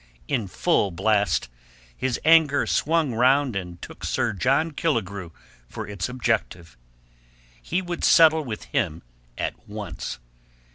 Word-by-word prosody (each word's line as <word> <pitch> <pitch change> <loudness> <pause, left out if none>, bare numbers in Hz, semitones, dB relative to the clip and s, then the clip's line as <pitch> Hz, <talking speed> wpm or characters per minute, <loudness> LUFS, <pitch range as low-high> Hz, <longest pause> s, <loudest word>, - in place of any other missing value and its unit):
In 110 -5 -1
full 105 - +1
blast, 100 +3 +1 0.5
his 130 - -2
anger 160 -3 +5
swung 160 -4 +1
round 130 +1 +3
and 90 -3 -5
took - - -10
Sir - - 0
John 135 - +1
Killigrew 100 - -2 0.4
for - - -6
its 100 -1 -4
objective. 115 -9 -2 0.9
He 180 - -2
would 175 -1 -5
settle 160 -1 +6
with 115 -6 -6
him 95 - -2 0.3
at - - -5
once. 105 -5 -6
125 Hz, 125 wpm, -24 LUFS, 100-155 Hz, 0.9 s, settle